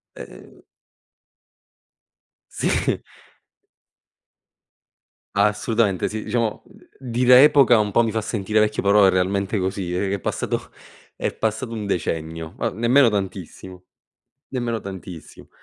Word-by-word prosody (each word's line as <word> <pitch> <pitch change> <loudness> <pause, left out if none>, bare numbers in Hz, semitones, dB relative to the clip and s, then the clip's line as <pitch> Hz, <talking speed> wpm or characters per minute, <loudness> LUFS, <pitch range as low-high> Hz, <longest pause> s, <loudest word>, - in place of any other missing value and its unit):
Ehm - - -13 1.9
Sì. - - -1 2.4
Assolutamente, 105 -1 +1
sì 110 0 -5
diciamo, 115 0 -2
uhm, - - -19 0.2
dire 125 +1 +5
epoca 140 -5 +6
un 105 -1 0
po' 120 - +3
mi 115 - -1
fa 110 0 -1
sentire 105 0 0
vecchio, 105 0 0
però 100 +1 +4
è - - +6
realmente 95 +2 0
così, 95 -1 -3
è 95 +2 -1
è 100 - 0
passato - - -3 0.5
è - - -2
passato 115 +2 -2
un 105 -2 -5
decennio, 80 -3 -3
ma - - -1
nemmeno 120 +4 +3
tantissimo, 95 -2 -6 0.7
nemmeno 120 -4 -3
tantissimo. 90 -4 -10
105 Hz, 115 wpm, -22 LUFS, 95-115 Hz, 2.4 s, epoca